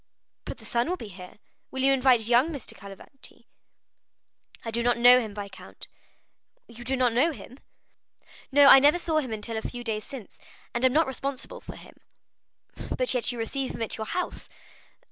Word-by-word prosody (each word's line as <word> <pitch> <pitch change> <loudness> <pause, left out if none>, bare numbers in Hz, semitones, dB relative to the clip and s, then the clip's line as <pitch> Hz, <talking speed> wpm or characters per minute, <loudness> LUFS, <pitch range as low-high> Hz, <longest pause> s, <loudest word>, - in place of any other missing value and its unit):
"But - - -6
the - - -15
son 240 +5 0
will 365 - -1
be 225 - -9
here; 180 0 -12 0.3
will 265 0 -4
you 275 0 +5
invite 255 -4 +3
young 245 +4 +4
M. 310 -4 -5
Cavalcanti?" 200 +6 -13 1.2
"I 225 - -3
do 235 +1 0
not 240 0 +2
know 245 +1 +8
him, 215 -4 -6
viscount." 200 -2 -10 0.8
"You 235 +1 -10
do 260 +2 -1
not 250 -2 +2
know 280 +8 +3
him?" 265 -2 -12 0.9
"No, 285 +1 +6
I 270 -1 +10
never 290 +5 +5
saw 325 -3 0
him 260 -6 -5
until 220 +1 -4
a - - -3
few 245 +1 -6
days 215 -2 -3
since, 255 -8 -11 0.3
and 240 - -2
am 260 - +5
not 320 +2 +4
responsible 270 0 -5
for - - -10
him." - - -15 1.0
"But 250 -1 +1
you 245 - -7
receive 260 +4 -3
him - - -3
at 225 - -3
your 220 -1 -5
house?" 360 - -4
245 Hz, 185 wpm, -26 LUFS, 225-270 Hz, 1.2 s, I